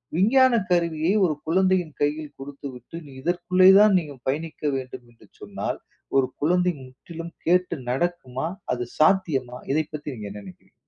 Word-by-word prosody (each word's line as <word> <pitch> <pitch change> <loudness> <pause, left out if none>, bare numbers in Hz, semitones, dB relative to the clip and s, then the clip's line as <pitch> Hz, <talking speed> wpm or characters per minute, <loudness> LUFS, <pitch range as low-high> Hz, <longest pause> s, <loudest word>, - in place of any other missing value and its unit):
விஞ்ஞானக் 235 +2 +4
கருவியை, 170 -1 +1
ஒரு 155 -4 0
குழந்தையின் 185 -2 +1
கையில் 150 0 -1
கொடுத்துவிட்டு, 140 0 -9
நீ 140 - -13
இதற்குள்ளே 180 +2 +4
தான் 210 -1 +6
நீ 165 - -6 0.2
பயணிக்க 155 +3 -4
வேண்டும் 125 -2 -8
என்று 115 - -21
சொன்னால், - - -4 0.4
ஒரு 130 - +3
குழந்தை 180 +3 +2
முற்றிலும் 165 +6 -10
கேட்டு 180 +1 +2 0.2
நடக்குமா? 135 -2 -2 0.3
அது 125 -1 -2 0.2
சாத்தியமா? 155 -8 +2
இதை 155 +1 +1
பத்தி 150 -1 -5
நீங்க 105 -3 -7
என்ன 105 - -8
நெனைக்கிறீங்க? 95 - -15
160 Hz, 145 wpm, -24 LUFS, 135-180 Hz, 0.4 s, தான்